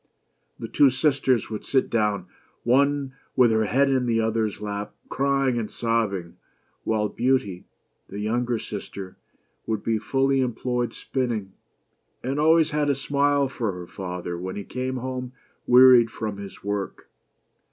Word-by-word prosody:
The - - -6
two 140 - +5
sisters 130 -4 +1
would 105 - -4
sit 135 -2 +1
down, 105 -5 0 0.4
one 140 +2 +2 0.2
with 125 -3 +5
her 110 0 +2
head 135 +7 +3
in 130 -2 +1
the 115 -1 +2
other's 110 -1 0
lap, 105 0 -5
crying 135 -2 +1
and 110 - -4
sobbing; 105 -7 -1 0.5
while 110 -1 +1
Beauty, 105 -6 0 0.4
the 100 - -7
younger 120 +3 0
sister, 95 -3 -7 0.5
would 110 -2 -2
be 110 -1 0
fully 135 +4 +1
employed 125 0 -1
spinning; 115 -7 -3 0.7
and 135 +3 -2
always 160 +1 +4
had 150 -1 +1
a 140 - +2
smile 140 +1 +1
for 120 -5 -2
her 90 -1 -7
father 90 -2 -5
when 95 +1 -5
he 105 - -5
came 130 +3 -3
home 130 0 -5 0.3
wea 125 +1 +8
ried 125 -3 +7
from 110 -3 -5
his 100 -1 -9
work. 100 -1 -4
120 Hz, 150 wpm, -25 LUFS, 105-135 Hz, 0.7 s, wea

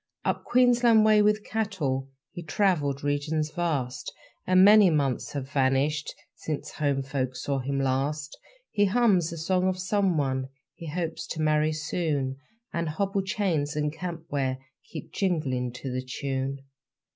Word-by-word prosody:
Up - - 0
Queensland 240 -3 +5
way 215 -1 +6
with 210 0 +2
cattle 165 -12 -2 0.2
He 175 - -7
travelled 150 -5 0
regions 150 +2 -1
vast; 145 -7 -2 0.4
And 185 +1 +6
many 210 -2 +8
months 140 -5 0
have 140 -2 -4
vanished 140 +2 +1 0.2
Since 150 -1 -5
home 140 -3 0
folk 130 -2 -2
saw 135 +2 -2
him 135 +2 -2
last. 140 +3 -1 0.4
He 205 -1 +3
hums 195 -6 +3
a 170 - -6
song 180 +3 +1
of 185 -1 0
someone 165 -9 0 0.2
He 165 - -9
hopes 160 0 -3
to 160 - -4
marry 155 0 +2
soon; 150 -4 -2 0.4
And 170 -1 -1
hobble 195 +5 -1
chains 180 -7 -1
and 150 0 -1
camp 170 0 -6
ware 135 -2 0 0.3
Keep 155 - -8
jingling 140 -10 -1
to 130 +1 -6
the 130 0 -2
tune. 135 +1 -3
155 Hz, 145 wpm, -27 LUFS, 135-185 Hz, 0.4 s, many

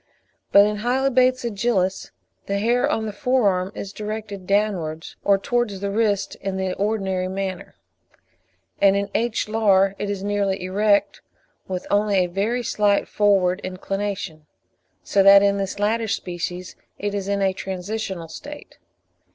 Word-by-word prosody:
But 200 0 +8
in 210 0 -1
Hylobates 255 +2 +2
agilis 200 -4 0 0.4
the 200 - 0
hair 235 +4 +2
on 220 - -1
the 210 - -4
fore 250 +1 +1
arm 185 0 0
is 200 0 -6
directed 210 -3 -6
downwards 185 -6 -1
or 200 -1 +4
towards 225 -1 -1
the 200 0 -3
wrist 205 -2 0
in 195 -1 -4
the 190 -1 -1
ordinary 195 -3 -1
manner; 190 0 -5 1.1
and 195 -1 +5
in 200 0 -2
H. 235 -2 0
lar 200 -3 +3
it 205 - -3
is 200 -1 -3
nearly 200 -1 0
erect, 200 +2 +1 0.5
with 185 -1 -4
only 205 -1 +2
a 185 - +3
very 205 +7 -1
slight 205 -3 +1
forward 195 -2 +2
inclination; 185 -4 -4 0.6
so 200 - +2
that 195 +1 +8
in 200 0 +3
this 195 0 -3
latter 220 +2 0
species 180 -2 -4 0.2
it 205 0 -3
is 200 -1 -3
in 200 0 0
a 190 -1 +2
transitional 190 -1 -5
state. 295 - -10
200 Hz, 150 wpm, -22 LUFS, 190-215 Hz, 1.1 s, But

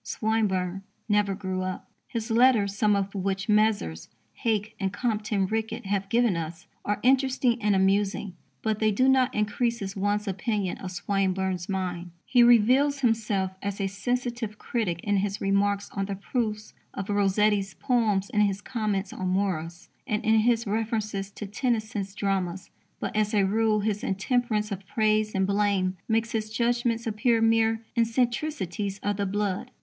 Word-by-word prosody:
Swinburne 195 -4 -1 0.3
never 205 -2 +2
grew 190 -2 -3
up. 185 0 -4 0.2
His 230 -2 -4
letters, 225 -4 +4
some 210 0 +3
of 200 0 -1
which 195 +1 -2
Messrs. 210 - +1 0.2
Hake 215 -2 -1
and 195 -1 -1
Compton 210 -2 -1
Rickett 220 +1 -3
have 195 0 -1
given 235 -3 +3
us, 165 +1 -5 0.2
are 205 0 -1
interesting 255 -2 +2
and 210 -1 +2
amusing, 195 0 +1 0.3
but 220 -1 0
they 215 -1 +3
do 255 +6 +2
not 265 -1 +4
increase 210 -1 -1
one's 205 +1 0
opinion 195 0 -2
of 190 - -5
Swinburne's 190 -1 -1
mind. 180 -2 -3 0.2
He 245 - +4
reveals 250 +5 +5
himself 215 -6 +1
as 200 0 -4
a 195 - 0
sensitive 235 +2 -2
critic 190 -10 -2
in 205 -1 +1
his 200 0 -1
remarks 200 +1 +1
on 195 -1 -2
the 200 0 -4
proofs 215 +1 -3 0.2
of 195 - -4
Rossetti's 200 -2 +2
poems, 215 - +1
in 210 - +2
his 200 -2 +1
comments 205 -4 -2
on 185 - -3
Morris, 180 -3 -2 0.2
and 215 -2 -1
in 220 0 +5
his 235 +1 +2
references 215 -2 -2
to 210 - -8
Tennyson's 215 -2 -2
dramas. 190 -3 -2 0.3
But, - - -4
as 215 0 +1
a 200 - +4
rule, 215 +1 +2
his 210 +1 -1
intemperance 215 0 0
of 195 -1 -6
praise 215 0 +1
and 190 0 +2
blame 200 -2 +1
makes 225 0 +1
his 215 -1 -2
judgments 235 0 0
appear 225 +1 +2
mere 225 0 +2
eccentricities 235 - -1
of 205 0 0
the 200 -1 -1
blood. 200 -1 -2
210 Hz, 155 wpm, -27 LUFS, 195-225 Hz, 0.3 s, reveals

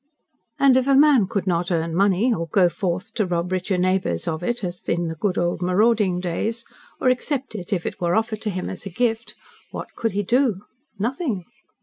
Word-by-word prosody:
And, 270 -2 +5
if 260 0 +1
a 275 - +5
man 275 -7 +5
could 200 -2 -2
not 175 -2 0
earn 165 -2 -1
money 200 +5 +3
or 165 -4 -3
go 180 +2 +4
forth 185 +4 -3
to 215 - 0
rob 175 0 -1
richer 185 +1 0
neighbours 185 - 0
of 160 0 -2
it 240 +4 -2
as 180 -1 -5
in 170 -1 0
the 160 - -5
good 185 +4 -1
old 175 0 0
marauding 195 0 +2
days 215 +6 -2 0.3
or 255 - +3
accept 260 +1 -1
it 185 -5 -7
if 180 -4 -1
it - - -5
were 175 0 +1
offered 220 -1 -1
to 215 - -2
him 185 -2 -3
as 190 - -6
a - - -4
gift 225 +3 -1 0.3
what - - -7
could 225 -4 -1
he 205 +1 0
do? 235 -2 +2 0.4
Nothing. 230 - -2
195 Hz, 210 wpm, -23 LUFS, 175-230 Hz, 0.4 s, And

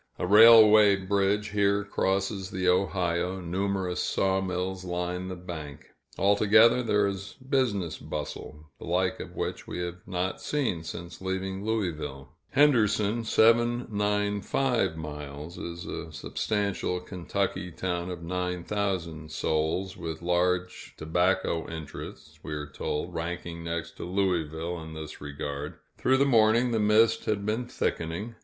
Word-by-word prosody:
A - - -2
railway 110 0 +8
bridge 100 +2 0
here 100 0 +2
crosses 95 -1 -1
the 95 -1 -2
Ohio, 90 -1 +1
numerous 95 +1 -1
sawmills 95 -1 -1
line 90 0 -3
the 95 - -5
bank; 80 -5 -8 0.3
altogether, 110 +4 +5
there 105 -3 +2
is 100 0 -4
business 130 - -1
bustle, 75 0 -7
the - - -8
like 90 +2 0
of - - -8
which - - -4
we - - -5
have 90 +1 -4
not 95 0 -2
seen 130 - -1
since 85 +2 -8
leaving 95 +1 -3
Louisville. 80 -11 -3 0.2
Henderson 115 -6 +3
(795 110 -2 +2
miles) 75 +1 -7
is 85 0 -6
a 80 - -6
substantial 100 +5 -2
Kentucky 90 0 -3
town 90 +1 -3
of 85 -2 -6
nine 90 0 -2
thousand 85 -7 -3
souls, 80 +5 -1
with 80 0 -6
large 90 +1 0
tobacco 85 +1 0
interests, 80 -2 -8
we 75 - -6
are 75 -1 -4
told, 75 +3 -4
ranking 85 0 -4
next 85 0 -4
to - - -6
Louisville 85 -3 -1
in 80 0 -9
this 80 -2 -8
regard. 70 0 -5 0.2
Through 130 +1 +3
the 140 - +4
morning, 115 -1 +4
the 115 - +1
mist 110 +2 +4
had 100 -2 -1
been 110 +3 -1
thickening. 85 +7 -3
95 Hz, 130 wpm, -28 LUFS, 85-105 Hz, 0.3 s, railway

